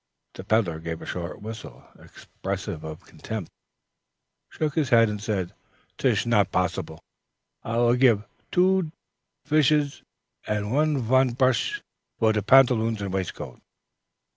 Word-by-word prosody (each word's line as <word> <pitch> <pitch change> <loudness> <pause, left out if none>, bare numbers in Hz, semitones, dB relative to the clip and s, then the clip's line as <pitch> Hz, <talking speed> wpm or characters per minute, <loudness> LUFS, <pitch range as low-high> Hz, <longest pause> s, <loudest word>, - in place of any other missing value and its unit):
The - - -9
peddler 100 -8 +1
gave 80 0 -5
a - - -9
short 90 +3 -6
whistle 110 0 -9
expressive 80 - -6
of 80 +3 -8
contempt, 110 -7 -7 1.0
shook 155 -2 -2
his 150 -6 0
head, 115 -2 +5
and 105 -1 -4
said, 100 -5 -2 0.5
"Tish - - +2
not 105 -5 +2
possibles. 90 -3 -2 0.6
I 115 +1 -3
will 120 0 +4
give 120 -5 +4 0.3
two 185 -2 +2 0.6
pishers 150 -1 +2 0.5
and 130 +9 +1
von 130 +1 +2
prush 130 - +1 0.3
for 110 -1 +3
te 105 - 0
pantaloon 115 -1 +4
and 100 -2 -4
waistcoat." 95 -2 -5
115 Hz, 125 wpm, -25 LUFS, 95-130 Hz, 1.0 s, head